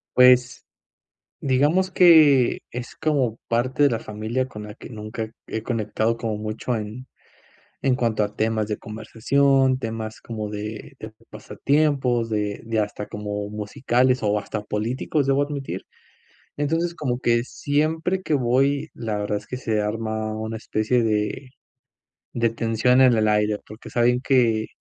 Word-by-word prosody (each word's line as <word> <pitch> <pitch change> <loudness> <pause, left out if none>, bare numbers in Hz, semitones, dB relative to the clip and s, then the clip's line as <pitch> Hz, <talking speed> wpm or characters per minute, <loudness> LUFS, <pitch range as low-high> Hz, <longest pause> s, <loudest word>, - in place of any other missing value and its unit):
Pues, 125 -1 +5 0.8
digamos 150 +8 +2
que 155 -8 +6
es, 120 0 -7
como 140 -8 0
parte 130 +4 +1
de 140 - +6
la 115 - 0
familia 110 +4 -3
con 105 -3 -9
la 105 0 -8
que - - -11
nunca 110 0 -6 0.2
he 110 - -4
conectado 115 0 -1
como 110 -2 -3
mucho 110 +3 -3
en 110 +5 -6 0.8
en 130 -2 +3
cuanto 115 -4 +1
a 105 - -4
temas 110 -1 0
de 105 - -2
conversación, 130 +5 +1
temas 110 -2 -5
como 110 -2 -5
de 105 +5 -6
de 110 0 -8 0.2
pasatiempos 125 +2 0
de 105 -1 -2
de 115 -1 -1
hasta 105 0 -3
como 105 0 -4
musicales 120 +4 +1
o 105 0 +1
hasta 105 +1 -4
políticos, 120 +8 -1
debo 135 +1 +2
admitir. 145 -2 -5 0.8
Entonces, 165 +4 0
como 125 -5 -2
que 120 -1 +2
siempre 160 +7 -1
que 155 - -2
voy, 135 +3 +2
la 110 -3 -3
verdad 105 0 -1
es 105 - -11
que 125 - -5
se 110 -4 -1
arma 110 0 -2
una 110 +1 -4
especie 115 +2 0
de 110 +4 -1 0.8
de 115 -1 +1
tensión 115 +2 +2
en 130 -2 +6
el 110 -1 +2
aire, 105 0 +2
porque 110 +2 -11
saben 125 +1 +2
que 115 -5 +2
115 Hz, 150 wpm, -23 LUFS, 110-130 Hz, 0.8 s, que